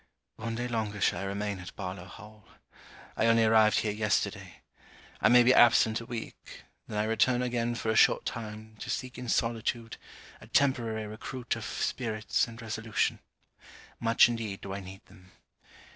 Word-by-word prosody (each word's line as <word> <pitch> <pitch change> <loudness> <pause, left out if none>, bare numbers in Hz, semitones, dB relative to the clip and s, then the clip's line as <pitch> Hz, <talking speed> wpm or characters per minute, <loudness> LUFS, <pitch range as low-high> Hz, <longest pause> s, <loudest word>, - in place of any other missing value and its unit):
One 115 +1 -4
day 120 +1 -3
longer 110 -3 -3
shall 90 - +1
I 100 - -4
remain 100 0 -3
at 90 - -10
Barlowe 90 0 -6
Hall. 105 +1 -14 0.7
I 115 - +2
only 115 0 +5
arrived 110 -1 +4
here 105 - -1
yesterday. 105 0 -1 0.7
I - - +5
may 125 0 +7
be 125 +2 +5
absent 115 -2 +5
a 115 - -10
week; 115 -2 -8 0.2
then 105 - -5
I 105 - +2
return 120 +3 +2
again 120 -1 -1
for 110 -1 -1
a - - -1
short - - +4
time, 110 -1 -7
to - - -7
seek 130 -1 -4
in 125 -1 -6
solitude, 115 0 -1 0.4
a - - -13
temporary 115 -6 +1
recruit 115 +3 -5
of - - -6
spirits 110 -3 -1
and 115 0 -11
resolution. 110 -1 -1 0.8
Much 115 0 +5
indeed 115 -4 -4
do 95 - -6
I 100 - -4
need 95 0 -11
them. 95 -2 -19
110 Hz, 170 wpm, -29 LUFS, 105-115 Hz, 0.8 s, may